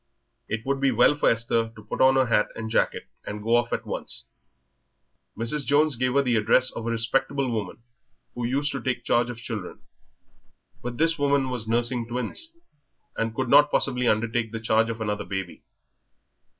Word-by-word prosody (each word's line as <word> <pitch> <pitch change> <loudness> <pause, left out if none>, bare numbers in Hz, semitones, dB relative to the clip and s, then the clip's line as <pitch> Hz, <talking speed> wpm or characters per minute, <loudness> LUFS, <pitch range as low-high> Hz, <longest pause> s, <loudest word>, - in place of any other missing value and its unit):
It 115 +1 -4
would 140 0 -1
be 135 - +4
well 145 - +4
for 145 - +2
Esther 115 0 0
to 110 - -12
put 105 - -4
on 130 0 +6
her 130 -1 +4
hat 110 -3 +2
and 110 0 -5
jacket - - 0 0.2
and 105 0 -6
go 115 +2 +3
off 120 0 +1
at - - -2
once. - - -4 1.1
Mrs. 115 +6 -1
Jones 145 +1 +3
gave 125 +2 0
her 140 - +4
the 120 -3 +2
address 130 +4 +3
of 115 - -6
a - - 0
respectable 130 +3 0
woman 110 0 -4 0.5
who 125 - -5
used 140 +5 0
to 140 - -4
take 125 -2 -2
charge 120 0 +2
of 120 - -6
children. 115 -6 -7 1.0
But 120 0 -5
this 165 0 +2
woman 140 -2 +2
was 120 -3 -2
nursing 120 +1 0
twins, 125 - -4 0.6
and 115 0 -2
could 130 +1 -1
not 145 +3 +6
possibly 125 -4 +1
undertake 110 +1 0
the 115 - -4
charge 110 0 +2
of 115 -1 -5
another 105 -1 -2
baby. 95 -3 -5
120 Hz, 185 wpm, -25 LUFS, 115-135 Hz, 1.1 s, on